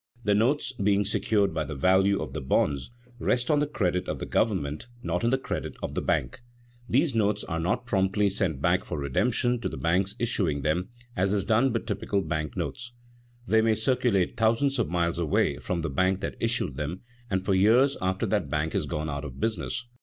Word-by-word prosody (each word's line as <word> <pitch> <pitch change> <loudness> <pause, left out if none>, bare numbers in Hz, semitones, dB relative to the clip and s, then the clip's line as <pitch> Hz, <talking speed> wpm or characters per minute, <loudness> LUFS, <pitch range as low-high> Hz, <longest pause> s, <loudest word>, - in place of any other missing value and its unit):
The 105 - +3
notes, 125 +9 +2
being 100 0 +3
secured 100 -1 +1
by 80 -1 -1
the 75 0 -6
value 95 +6 +3
of - - -8
the - - -4
bonds, 70 +1 0 0.3
rest 125 +4 +1
on 150 - +4
the 145 - +1
credit 90 - -1
of - - -2
the - - -5
government, 85 -7 -1 0.2
not 90 -2 -1
on 115 - +3
the 130 - +2
credit 130 - -4
of - - -3
the - - -1
bank. 135 - -1 0.5
These 140 +3 +2
notes 105 -2 +1
are 80 - -3
not 90 +9 -1
promptly 100 -2 +2
sent 95 -7 -1
back - - +3
for - - -5
redemption 120 - +1
to - - -1
the - - -7
banks 90 +4 +1
issuing 95 - 0
them, 90 +6 0 0.3
as 95 +2 +1
is 100 -2 0
done 115 +5 +3
with 115 - -2
typical 100 -1 -1
bank 80 -6 -3
notes. 120 0 -4 0.5
They 110 -1 +4
may 110 0 +3
circulate 110 -5 +1
thousands 115 +5 +2
of - - 0
miles 85 0 0
away 80 -4 +1
from 90 -2 -3
the 80 - -1
bank 95 +6 +1
that - - -3
issued 115 - 0
them, 75 +5 -4 0.3
and 95 -1 -1
for 100 - +2
years 115 +9 +4
after 95 +1 0
that - - 0
bank 75 +1 -1
has - - -1
gone 75 +1 -3
out 70 -1 -4
of 65 -2 -8
business. 115 - -2
100 Hz, 205 wpm, -27 LUFS, 85-115 Hz, 0.5 s, on